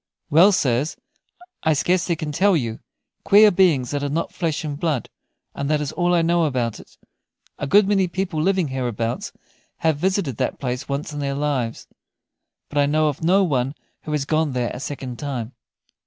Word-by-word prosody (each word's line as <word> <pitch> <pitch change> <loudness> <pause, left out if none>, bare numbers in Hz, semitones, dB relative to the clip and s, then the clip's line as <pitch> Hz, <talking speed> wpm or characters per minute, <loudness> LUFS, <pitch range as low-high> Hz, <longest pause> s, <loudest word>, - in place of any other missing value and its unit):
"Well, 170 +7 +7
sirs, 135 -4 0 0.6
I 160 - +2
scarcely 175 +3 +1
can 155 -1 -4
tell 185 +4 +3
you; 115 -5 -3 0.4
queer 210 +1 +7
beings 170 -9 +3
that 145 -1 -2
are 145 - -2
not 160 +4 -2
flesh 165 -2 -2
and 145 -2 -4
blood, 155 -8 -1 0.4
and 140 0 -3
that 150 -1 +2
is 150 -2 -3
all 175 0 +1
I 170 - +3
know 170 0 +2
about 120 -6 -1
it. - - -16 0.6
A - - -3
good 200 +6 +5
many 195 -2 +2
people 180 -3 -2
living 185 -2 +1
hereabouts 120 -3 -3 0.5
have 160 -3 +3
visited 185 - 0
that 130 - -1
place 125 +1 -4
once 140 +2 -3
in 145 - -5
their 140 -1 -2
lives, 140 -5 -2 0.8
but 145 - -2
I 140 - +4
know 155 +1 +2
of 145 - -6
no 190 +4 +4
one 135 -4 0 0.3
who 155 - -7
has 145 -2 0
gone 155 -1 0
there 125 -2 -1
a - - -6
second 130 -3 -6
time." 130 -4 -4
150 Hz, 185 wpm, -22 LUFS, 135-170 Hz, 0.8 s, Well